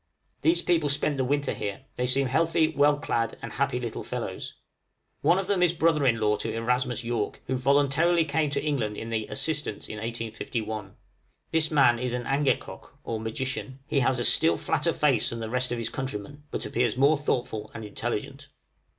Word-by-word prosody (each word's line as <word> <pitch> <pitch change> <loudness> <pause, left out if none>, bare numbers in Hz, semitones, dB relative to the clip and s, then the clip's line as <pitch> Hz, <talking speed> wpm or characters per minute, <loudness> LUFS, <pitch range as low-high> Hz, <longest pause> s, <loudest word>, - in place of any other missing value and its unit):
These 335 +2 +3
people 165 -4 +2
spent 145 0 +1
the 130 - +1
winter 145 +2 0
here; 100 +5 -4
they 125 - 0
seemed 130 0 +1
healthy, 160 +1 +3
well 145 -1 +3
clad, 115 -5 -1
and 115 - -7
happy 135 -2 0
little 120 -3 -4
fellows. - - -5 0.7
One 175 - +4
of 195 - -1
them 195 -2 +1
is 175 -1 +4
brother 160 -4 +3
in 115 -2 +3
law 105 -1 +2
to 110 - -3
Erasmus 125 +2 0
York, 115 -3 -2
who 130 - -1
voluntarily 145 +6 +3
came 155 -2 +1
to 140 - -2
England 120 -9 -1
in 115 - -5
the 110 -1 -1
'Assistance' 145 -6 -1
in 105 - -6
1851. 110 -2 -4 0.6
This 160 -1 +3
man 135 -6 +4
is 125 0 -1
an 120 -1 -4
angekok, 140 0 -1
or 115 -1 -3
magician; 130 +4 -4
he 140 - +1
has 130 0 +2
a 120 - 0
still 85 0 +4
flatter - - 0
face - - +2
than 115 - -4
the 110 -1 -5
rest 125 0 0
of 120 - -1
his 115 -1 -1
countrymen, 135 +2 -5
but - - -4
appears 120 -1 0
more 140 +4 +5
thoughtful 120 -7 -2
and 110 - -6
intelligent. 120 +6 -4
130 Hz, 190 wpm, -27 LUFS, 115-145 Hz, 0.7 s, more